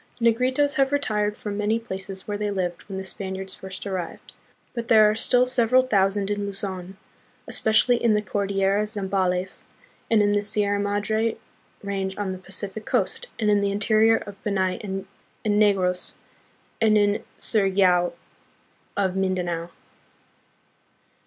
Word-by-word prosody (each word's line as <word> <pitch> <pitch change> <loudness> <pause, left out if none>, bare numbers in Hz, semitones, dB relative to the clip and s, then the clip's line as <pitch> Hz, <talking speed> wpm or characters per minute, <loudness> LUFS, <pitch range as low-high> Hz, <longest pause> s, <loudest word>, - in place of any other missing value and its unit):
The 230 -1 +4
Negritos 260 +4 +1
have 270 0 +3
retired 210 -7 0
from 205 -1 -5
many 210 +2 +1
places 195 -3 -7
where 205 - -2
they 210 0 -2
lived 180 -3 -2
when 190 - -5
the 190 - -4
Spaniards 190 0 -5
first 190 0 -8
arrived, 185 -4 -5 0.4
but 235 -1 -4
there 215 -2 +7
are 210 - +3
still 245 +2 +3
several 255 0 +3
thousand 200 -3 +1
in 205 0 -1
Luzon, 190 -2 -5 0.5
especially 230 +3 +2
in 225 -3 +4
the 210 - 0
Cordillera 200 +1 0
Zambales, 190 -3 -1 0.5
and 220 -2 +4
in 205 - +3
the 205 0 +2
Sierra 205 -1 +1
Madre 205 +2 0 0.5
range 195 -1 -3
on 205 -2 -2
the 185 - -6
Pacific 195 +3 -6
coast, - - -1
and 210 -2 +2
in 205 -1 +3
the 200 0 +1
interior 220 +2 +4
of 205 -2 -10
Panay 190 -3 0
and 195 -1 -4 0.4
Negros, 200 -4 +2 0.7
and 215 -1 +5
in 205 +1 +2
Surigao 190 -4 +2 0.8
of 190 -2 +1
Mindanao. 180 -3 -1
205 Hz, 145 wpm, -24 LUFS, 190-215 Hz, 0.8 s, there